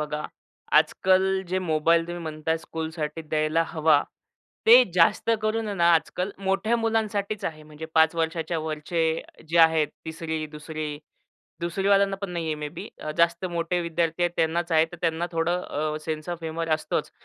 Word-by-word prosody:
बघा 150 Hz, 0 st, -3 dB, 0.5 s
आजकाल 190 Hz, 0 st, +3 dB, 0.3 s
जे 185 Hz, -, 0 dB
मोबाईल 165 Hz, -1 st, +2 dB
तुम्ही 175 Hz, 0 st, -6 dB
म्हणताय 160 Hz, 0 st, -2 dB
स्कूलसाठी 160 Hz, -1 st, -5 dB
द्यायला 155 Hz, +1 st, +1 dB
हवा, 155 Hz, -3 st, +3 dB, 0.6 s
ते 245 Hz, +3 st, +9 dB
जास्त 175 Hz, +6 st, +3 dB
करून 215 Hz, 0 st, 0 dB
ना 170 Hz, -, +2 dB
आजकाल 180 Hz, +4 st, -1 dB
मोठ्या 195 Hz, +4 st, +1 dB
मुलांसाठीच 215 Hz, -2 st, -1 dB
आहे. 155 Hz, -1 st, -4 dB
म्हणजे 150 Hz, +1 st, -9 dB
5 160 Hz, +1 st, +5 dB
वर्षाच्या 165 Hz, 0 st, -1 dB
वरचे 160 Hz, +1 st, -1 dB, 0.3 s
जे 170 Hz, +1 st, +1 dB
आहेत 160 Hz, -2 st, +5 dB, 0.2 s
3री-2री. 155 Hz, -1 st, -5 dB, 0.6 s
2री 175 Hz, +3 st, -1 dB
वाल्यांना 200 Hz, -1 st, +4 dB
पण 195 Hz, -1 st, -6 dB
नाहीये 165 Hz, -3 st, -2 dB
मे 150 Hz, 0 st, -5 dB
बी -, -, -6 dB, 0.3 s
जास्त 170 Hz, +2 st, +2 dB
मोठे 170 Hz, +1 st, -1 dB
विद्यार्थी 170 Hz, 0 st, -1 dB
आहेत 175 Hz, -, +2 dB
त्यांनाच 165 Hz, +1 st, 0 dB
आहे. 160 Hz, 0 st, +5 dB
तर -, -, -7 dB
त्यांना 165 Hz, 0 st, 0 dB
थोडं 165 Hz, -2 st, -1 dB
सेन्स 155 Hz, 0 st, -4 dB
ऑफ 175 Hz, -1 st, -4 dB
ह्युमर 165 Hz, +1 st, -3 dB
असतोच. 155 Hz, -, -3 dB
165 Hz, 150 wpm, -25 LUFS, 155-175 Hz, 0.6 s, ते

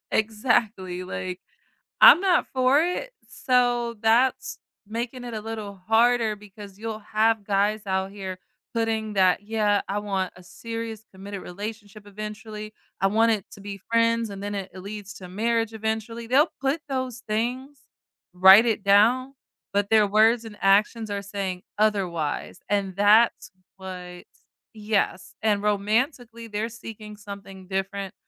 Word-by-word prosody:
Exactly, 210 Hz, -4 st, 0 dB
like, 185 Hz, 0 st, -5 dB, 0.6 s
I'm 350 Hz, -, +10 dB
not 375 Hz, -3 st, +2 dB
for 260 Hz, +3 st, +4 dB
it. 360 Hz, +9 st, -2 dB, 0.2 s
So 245 Hz, -2 st, +1 dB
that's 235 Hz, +4 st, +2 dB, 0.3 s
making 235 Hz, +3 st, -4 dB
it 240 Hz, -1 st, -6 dB
a 215 Hz, -, -4 dB
little 215 Hz, -2 st, -6 dB
harder 225 Hz, 0 st, +3 dB
because 205 Hz, -1 st, -13 dB
you'll 220 Hz, -1 st, -5 dB
have 220 Hz, +1 st, +1 dB
guys 205 Hz, +2 st, +1 dB
out 190 Hz, 0 st, -1 dB
here 190 Hz, -2 st, -6 dB, 0.4 s
putting 225 Hz, -2 st, -1 dB
that, 185 Hz, -1 st, +3 dB
yeah, 210 Hz, -1 st, +1 dB
I 200 Hz, +1 st, -1 dB
want 195 Hz, -3 st, -2 dB
a 180 Hz, -, -15 dB
serious 225 Hz, +3 st, -6 dB
committed 195 Hz, +1 st, -8 dB
relationship 205 Hz, +2 st, -8 dB
eventually. 215 Hz, +1 st, -7 dB, 0.3 s
I 195 Hz, -, +4 dB
want 225 Hz, +3 st, +3 dB
it 210 Hz, -3 st, -1 dB
to 200 Hz, -, -12 dB
be 200 Hz, 0 st, -7 dB
friends 230 Hz, 0 st, +2 dB
and 200 Hz, -1 st, -8 dB
then 205 Hz, 0 st, -3 dB
it 195 Hz, -1 st, -5 dB
it 185 Hz, -, -9 dB
leads 200 Hz, 0 st, -8 dB
to 185 Hz, -4 st, -10 dB
marriage 225 Hz, +3 st, 0 dB
eventually. 220 Hz, +1 st, -3 dB
They'll 280 Hz, +7 st, +4 dB
put 275 Hz, +4 st, 0 dB
those 260 Hz, -3 st, -4 dB
things, 250 Hz, +6 st, -2 dB, 0.5 s
write 190 Hz, +5 st, +8 dB
it 220 Hz, -3 st, 0 dB
down, 230 Hz, +7 st, +4 dB, 0.4 s
but 200 Hz, 0 st, +1 dB
their 220 Hz, -1 st, +5 dB
words 220 Hz, +3 st, +4 dB
and 215 Hz, -2 st, -10 dB
actions 210 Hz, +3 st, +3 dB
are 200 Hz, 0 st, -2 dB
saying 195 Hz, -2 st, -4 dB
otherwise. 185 Hz, -7 st, -1 dB
And 195 Hz, -2 st, 0 dB
that's 210 Hz, +3 st, +4 dB, 0.3 s
what 180 Hz, -2 st, -8 dB, 0.5 s
yes. 210 Hz, -3 st, -2 dB
And 210 Hz, -2 st, +1 dB
romantically, 230 Hz, +3 st, -1 dB
they're 215 Hz, +1 st, -3 dB
seeking 220 Hz, -2 st, -10 dB
something 195 Hz, -2 st, -10 dB
different 195 Hz, 0 st, -3 dB
215 Hz, 145 wpm, -25 LUFS, 200-230 Hz, 0.6 s, I'm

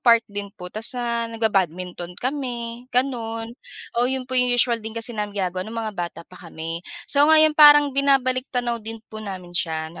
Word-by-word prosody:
park 230 Hz, -2 st, +5 dB
din 205 Hz, -1 st, -6 dB
po 180 Hz, -2 st, -8 dB
tas 220 Hz, +1 st, -4 dB
na 235 Hz, -1 st, -1 dB
nagba-badminton 180 Hz, -5 st, -2 dB
kami 245 Hz, -2 st, -4 dB
gano'n. 230 Hz, -3 st, -1 dB, 0.5 s
Oh, 245 Hz, -, +2 dB
'yon 265 Hz, 0 st, -2 dB
po 255 Hz, -, -10 dB
yung 250 Hz, -1 st, +3 dB
usual 240 Hz, -1 st, +2 dB
din 220 Hz, +1 st, -8 dB
kasi 230 Hz, +1 st, -2 dB
namin 210 Hz, -2 st, -4 dB
gagawa 185 Hz, -1 st, -1 dB
nung 230 Hz, -, -7 dB
mga 215 Hz, -, -4 dB
bata 175 Hz, -3 st, -5 dB
pa 180 Hz, -, -15 dB
kami. 165 Hz, +1 st, -5 dB, 0.2 s
So, 290 Hz, +1 st, +3 dB
ngayon 310 Hz, 0 st, +7 dB
parang 295 Hz, -1 st, +8 dB
binabalik-tanaw 255 Hz, -3 st, +1 dB
din 225 Hz, +1 st, -8 dB
po 215 Hz, -, -6 dB
namin 185 Hz, -4 st, -7 dB
siya 160 Hz, -2 st, -2 dB
na -, -, -11 dB
230 Hz, 185 wpm, -23 LUFS, 195-255 Hz, 0.5 s, parang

